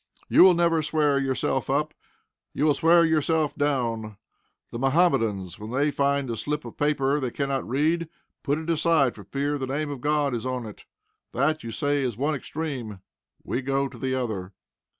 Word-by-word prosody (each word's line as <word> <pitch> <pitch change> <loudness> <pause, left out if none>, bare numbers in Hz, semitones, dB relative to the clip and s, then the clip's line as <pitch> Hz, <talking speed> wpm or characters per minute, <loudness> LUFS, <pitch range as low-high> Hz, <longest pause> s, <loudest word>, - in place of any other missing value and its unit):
You - - +6
will 185 -1 +7
never 170 -1 +2
swear 150 -2 +1
yourself 135 0 -1
up. 150 +3 0 0.6
You 145 - +1
will 150 - +4
swear 170 +3 +5
yourself 160 -1 +1
down. 115 -7 -1 0.5
The 115 - -5
Mohammedans, 115 - +1
when 105 +1 -7
they 140 +5 +1
find 140 -1 0
a - - -2
slip 150 +7 -3
of - - -9
paper 145 -1 +1
they 130 -3 -2
cannot 135 0 -2
read, 155 +5 +1 0.3
put 145 0 0
it 160 +1 -6
aside, 160 -5 +2
for 100 - -12
fear 145 +1 -2
the 130 - -3
name 145 +2 -2
of 135 -3 -6
God 145 -2 +1
is 115 - -3
on 130 -2 -3
it. 105 - -11 0.5
That, 155 +1 0
you 115 - -6
say, 145 +5 0
is 125 -5 -2
one 145 +4 0
extreme. 130 -8 -5 0.4
We 130 - -2
go 135 +1 0
to - - -12
the 130 -1 -1
other. 105 -7 -3
140 Hz, 185 wpm, -25 LUFS, 125-150 Hz, 0.6 s, will